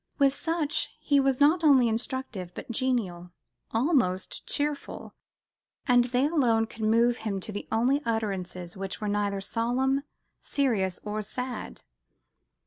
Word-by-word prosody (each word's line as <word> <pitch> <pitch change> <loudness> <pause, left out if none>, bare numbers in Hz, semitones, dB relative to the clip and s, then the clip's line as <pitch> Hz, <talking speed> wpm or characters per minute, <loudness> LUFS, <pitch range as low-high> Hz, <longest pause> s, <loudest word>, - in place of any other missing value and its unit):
With 275 -2 +4
such, 325 0 -1
he 285 -1 +3
was 270 -1 +2
not 315 +4 +4
only 270 -5 +6
instructive, 225 -5 -3
but - - -6
genial, 220 -9 -1 0.4
almost 225 - 0
cheerful; 290 0 -3 0.7
and 245 -2 +5
they 250 +2 +1
alone 245 -8 +2
could 225 0 -12
move 235 +2 +3
him 205 -3 -3
to 215 - -5
the 205 - -6
only 255 +6 +2
utterances 190 -6 -3
which 195 0 -5
were 210 - -3
neither 205 -1 0
"solemn, 250 +6 0 0.4
serious 210 -10 0
or 210 0 -3
sad." 250 +3 -6
235 Hz, 135 wpm, -28 LUFS, 205-270 Hz, 0.7 s, only